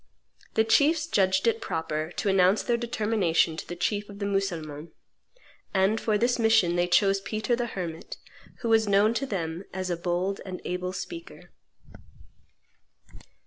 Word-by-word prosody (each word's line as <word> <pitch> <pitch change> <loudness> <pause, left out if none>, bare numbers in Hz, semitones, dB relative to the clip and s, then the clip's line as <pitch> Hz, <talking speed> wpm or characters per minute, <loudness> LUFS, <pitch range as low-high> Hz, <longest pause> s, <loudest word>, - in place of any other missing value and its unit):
The 220 - +4
chiefs 300 +8 +3
judged 190 - +2
it 230 -1 +1
proper 160 0 -3
to - - -3
announce 190 +1 +4
their 240 - +1
determination 215 -8 +1
to - - -7
the 175 - -5
chief 205 +3 -2
of 200 - -10
the 200 - -3
Mussulmans; 170 -6 -3 0.9
and 195 +4 +2
for 215 -2 +1
this 240 +3 +1
mission 220 -6 +4
they 175 0 +2
chose 195 +2 +3
Peter 215 +4 -1
the 240 0 -2
Hermit, 170 -7 -6 0.4
who 235 - -2
was 220 -2 +3
known 205 +3 +4
to 275 +4 -2
them 170 -4 -3
as 185 -1 -3
a - - +1
bold 180 +3 -2
and 185 -2 -6
able 180 0 -3
speaker. 335 - -8
195 Hz, 155 wpm, -27 LUFS, 175-225 Hz, 0.9 s, The